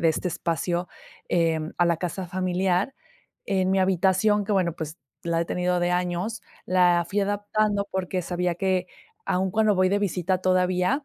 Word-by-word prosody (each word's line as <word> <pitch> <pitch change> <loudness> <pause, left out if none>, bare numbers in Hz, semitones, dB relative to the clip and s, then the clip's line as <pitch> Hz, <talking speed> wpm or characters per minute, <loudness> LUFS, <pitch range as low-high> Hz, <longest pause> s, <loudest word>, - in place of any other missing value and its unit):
de 165 - +4
este 160 +3 0
espacio, 170 +2 -2 0.4
eh, 165 -2 +2 0.2
a 175 - +5
la 170 -1 +2
casa 180 +2 -4
familiar, 185 +4 0 0.5
en 190 -1 +1
mi 195 - +2
habitación 190 +3 +2
que, 210 - -2
bueno, 175 -4 +1
pues 160 +1 -6 0.2
la 170 -1 0
he - - 0
tenido 180 +1 0
de 175 0 +1
años, 180 +5 -1 0.2
la 180 -2 +4
fui 205 0 0
adaptando 205 0 0
porque 185 -1 -2
sabía 175 0 -1
que, 185 -1 0 0.4
aun 190 +1 0
cuando 215 +1 +3
voy 185 0 +3
de 200 - +2
visita 185 -2 0
todavía, 185 +8 +1
185 Hz, 170 wpm, -25 LUFS, 175-195 Hz, 0.5 s, a